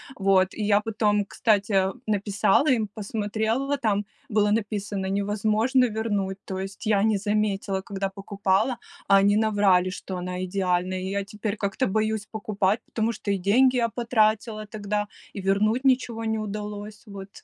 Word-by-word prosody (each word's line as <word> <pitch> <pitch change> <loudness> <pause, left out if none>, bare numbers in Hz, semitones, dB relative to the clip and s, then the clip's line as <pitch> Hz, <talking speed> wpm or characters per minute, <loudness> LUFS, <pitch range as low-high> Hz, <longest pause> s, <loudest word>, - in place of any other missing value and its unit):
Вот, 190 -2 +2
и 215 - -3
я 205 0 +3
потом, 210 -1 +1
кстати, 200 -3 +2 0.2
написала 205 +3 +2
им, 225 -4 +1
посмотрела, 220 +6 -2
там 210 -4 0 0.2
было 210 -1 +2
написано: 205 -2 -2
"Невозможно 215 +6 +1
вернуть". 210 -4 -2
То 190 - -5
есть 195 +3 -6
я 205 -2 +3
не 220 -1 +3
заметила, 205 -1 -1
когда 195 0 -3
покупала, 200 +4 0 0.3
а 195 - +6
они 200 +1 +4
наврали, 200 -4 +3
что 185 0 -6
она 180 +1 -4
идеальная, 185 -1 0
и 185 +1 -4
я 200 0 -1
теперь 210 +1 -4
как-то 200 +6 -1
боюсь 215 0 0
покупать, 210 -1 -1
потому 225 0 -1
что 210 - -6
и 200 - +2
деньги 245 +8 +3
я 235 -2 +2
потратила 220 -2 +1
тогда, 210 -1 -3 0.3
и 200 - -5
вернуть 210 +6 +1
ничего 250 -3 +1
не 220 0 0
удалось. 210 0 -6
Вот 200 -1 -9
210 Hz, 155 wpm, -25 LUFS, 195-220 Hz, 0.3 s, а